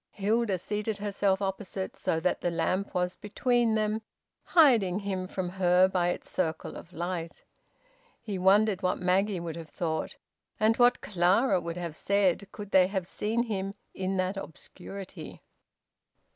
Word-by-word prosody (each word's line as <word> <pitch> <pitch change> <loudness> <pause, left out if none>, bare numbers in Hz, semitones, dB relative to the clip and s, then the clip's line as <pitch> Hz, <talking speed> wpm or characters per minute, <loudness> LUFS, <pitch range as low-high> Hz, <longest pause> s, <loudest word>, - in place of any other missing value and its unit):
Hilda 210 0 +1
seated 210 +3 -3
herself 200 -1 0
opposite, 195 0 -4
so 160 - -1
that 180 - 0
the 175 - +1
lamp 175 +4 -1
was 180 0 0
between 235 +2 +1
them, 215 0 0 0.4
hiding 230 - +4
him 190 -2 -3
from 185 -1 -3
her 180 0 +4
by 180 -2 +1
its - - -4
circle 160 -3 -2
of 170 - -10
light. 170 -1 -4 0.8
He 205 -5 -5
wondered 200 +1 +4
what 185 -1 +1
Maggie 185 +2 +1
would 170 -2 -5
have 165 -2 -8
thought, 160 -2 -3 0.4
and 220 +1 +4
what 245 0 +4
Clara 185 +3 +2
would 170 +1 -5
have 170 -3 -5
said, 200 0 +1
could 205 -2 -9
they 185 -1 +6
have 190 -2 -2
seen 220 +5 -1
him 195 -4 -3 0.2
in 190 0 -2
that 185 +1 -1
obscurity. 185 0 -9
190 Hz, 150 wpm, -29 LUFS, 180-210 Hz, 0.8 s, they